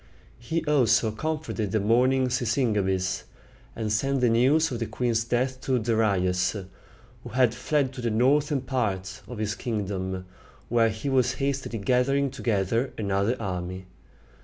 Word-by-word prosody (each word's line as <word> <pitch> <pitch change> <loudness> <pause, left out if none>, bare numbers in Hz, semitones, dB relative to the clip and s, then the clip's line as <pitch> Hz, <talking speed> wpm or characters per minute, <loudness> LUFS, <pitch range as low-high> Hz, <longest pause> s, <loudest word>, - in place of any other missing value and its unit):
He 160 +8 -2
also 125 -6 +3
comforted 115 -4 -3
the 110 - +2
mourning 125 +5 +3
Sisygambis, 105 -7 0 0.5
and 110 -2 -2
sent 135 +4 +1
the 125 - +4
news 135 +8 +3
of 120 - -3
the 115 - -2
queen's 115 +1 0
death 130 +2 -1
to 130 -1 +1
Darius, 100 -5 +1 0.7
who - - -8
had 125 -2 +3
fled 135 +2 0
to 130 - -7
the 120 - 0
northern 140 +5 +2
part 100 -7 -2
of 125 - -7
his 105 0 -1
kingdom, 95 -6 -3 0.4
where 115 -1 +3
he 110 +5 -5
was 130 -2 +2
hastily 135 -4 -2
gathering 130 +5 +1
together 115 0 0
another 100 +3 0
army. 95 -2 -4
115 Hz, 140 wpm, -26 LUFS, 105-130 Hz, 0.7 s, the